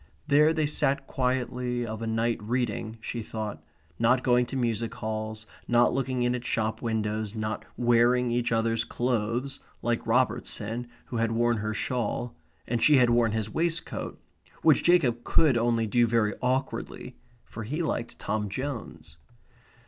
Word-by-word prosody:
There 150 +1 +5
they 160 -2 +1
sat 140 -1 +1
quietly 125 -1 -1
of 110 0 -5
a 115 - -3
night 115 0 0
reading, 115 -1 -2
she 120 +1 -4
thought. 105 -7 -5 0.4
Not 125 +3 +3
going 125 -1 +3
to 135 - -6
music 115 -3 -1
halls; 110 0 -4 0.2
not 120 0 +4
looking 130 -1 0
in 120 0 +2
at 125 -1 -3
shop 110 -2 -1
windows; 110 -1 -2
not 110 0 -3
wearing 120 +1 +3
each 120 0 0
other's 115 0 +1
clothes, 120 +3 -1 0.2
like 120 0 -1
Robertson 120 -1 0 0.2
who 120 - -5
had 115 0 +1
worn 120 0 +2
her 110 0 -2
shawl, 120 -1 -2 0.3
and 120 -1 -1
she 150 -2 +6
had 125 -2 +5
worn 120 -2 +3
his 110 -1 -2
waistcoat, 165 0 -2 0.4
which 155 -3 +5
Jacob 135 -10 +3
could 150 -6 +3
only 115 -1 +2
do 120 +2 +3
very 110 -2 +2
awkwardly; 130 +1 -2 0.3
for 110 - -8
he 150 +10 -2
liked 120 -6 -3
Tom 105 -1 -2
Jones. 120 - -6
120 Hz, 155 wpm, -27 LUFS, 110-125 Hz, 0.4 s, she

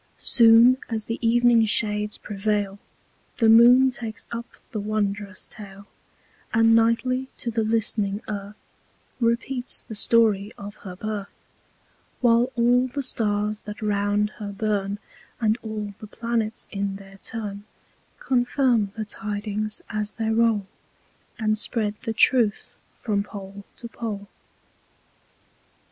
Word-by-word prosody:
Soon 235 +1 +6
as 220 -2 -1
the 230 - -4
Evening 235 0 +4
Shades 210 -1 0
prevail, 205 -1 -2 0.6
The 225 -2 +4
Moon 245 +3 +7
takes 225 -3 -7
up 235 0 -5 0.2
the 215 - -3
wondrous 205 -2 -2
Tale, 200 -2 -11 0.7
And 225 0 +5
nightly 240 +3 +2
to 235 - -3
the 225 0 0
list'ning 215 -2 0
Earth, 205 0 -6 0.6
Repeats 245 +2 -1
the - - -7
Story 215 -2 +3
of 205 +1 -9
her 185 -2 -9
Birth: 210 0 -5 0.8
While 240 +1 +3
all 245 +1 +3
the 275 +2 -4
Stars 210 -3 -1
that 210 +1 -7
round 205 0 +1
her 205 -1 -5
burn, 200 -1 -1 0.4
And 220 0 +1
all 215 -2 -5
the 215 - -9
Planets 225 0 -2
in 200 -1 -2
their 195 0 -13
Turn, 205 -3 -6 0.5
Confirm 245 -3 +2
the 220 -1 -4
Tidings 210 +1 -4
as 210 -1 -3
they 225 -1 -1
rowl, 225 -3 +2 0.7
And 215 -2 +1
spread 215 -2 -1
the 225 - -2
Truth 225 -2 +3 0.3
from 205 -3 -1
Pole 200 -1 -9
to 235 - -7
Pole. 215 -4 -6
215 Hz, 125 wpm, -24 LUFS, 205-230 Hz, 0.8 s, Moon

